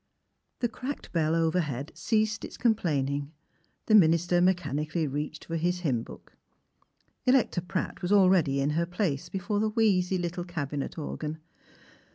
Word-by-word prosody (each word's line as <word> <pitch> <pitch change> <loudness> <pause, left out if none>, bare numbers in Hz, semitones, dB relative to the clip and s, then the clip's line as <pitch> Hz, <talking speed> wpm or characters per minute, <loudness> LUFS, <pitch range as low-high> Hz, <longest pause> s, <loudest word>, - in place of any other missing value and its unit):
The 240 - +2
cracked 255 +5 -6
bell 160 -1 +1
overhead 160 -5 0
ceased 220 -1 0
its - - -8
complain 170 - +1
ing; 140 +1 -3 0.5
the 220 - +1
minister 175 -2 +5
mechanically 165 -3 0
reached 150 +2 -4
for 165 - -3
his 175 +2 0
hymn 130 -9 0
book. - - -13 0.9
Electa 250 -8 +3
Pratt 185 +2 -4
was 180 - -2
already 185 -8 +4
in 140 +2 +1
her 170 +3 0
place 175 -6 -2
before 195 +2 -2
the 215 +1 +1
wheezy 195 -4 +2
little 175 0 -3
cabinet 150 -5 -4
organ. 155 0 -4
175 Hz, 145 wpm, -28 LUFS, 150-190 Hz, 0.9 s, minister